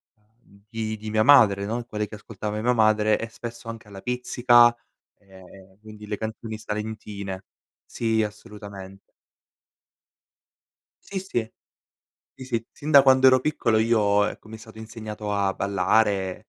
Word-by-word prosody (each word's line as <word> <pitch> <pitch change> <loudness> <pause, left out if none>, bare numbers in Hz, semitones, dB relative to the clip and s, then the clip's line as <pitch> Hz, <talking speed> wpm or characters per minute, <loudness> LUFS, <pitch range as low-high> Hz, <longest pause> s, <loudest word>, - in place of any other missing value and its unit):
uhm, 105 -2 -27
di 110 -1 -4
di 110 0 -8
mia 110 0 +2
madre, 105 -8 +5
no, 115 +3 -3
quelle 105 -2 -4
che 105 - -10
ascoltava 105 0 -6
mia 125 +2 +2
madre 110 -1 +3
e 115 - -4
spesso 115 +1 -9
anche 115 -2 -8
alla 100 -1 -10
Pizzica, 120 -1 +4 0.4
e 95 -1 -17
quindi 105 -1 -12
le 105 - -2
canzoni 110 0 -6
salentine. 105 -3 -6 0.4
Sì, 110 -1 -1
assolutamen 100 -2 -9 2.1
Sì, 195 - -5
sì. 120 - -4 0.8
Sì, 130 - -11
sì, 115 -2 -3
sin 150 +2 -6
da 140 -2 +9
quando 130 -1 +4
ero 130 0 +6
piccolo 125 -5 0
io, 105 -3 +2
ecco 105 - -7
mi 110 - -9
è - - -19
stato 110 -1 -14
insegnato 110 -2 -7
a 100 -1 0
ballare, 95 0 +1
110 Hz, 145 wpm, -24 LUFS, 105-115 Hz, 2.1 s, da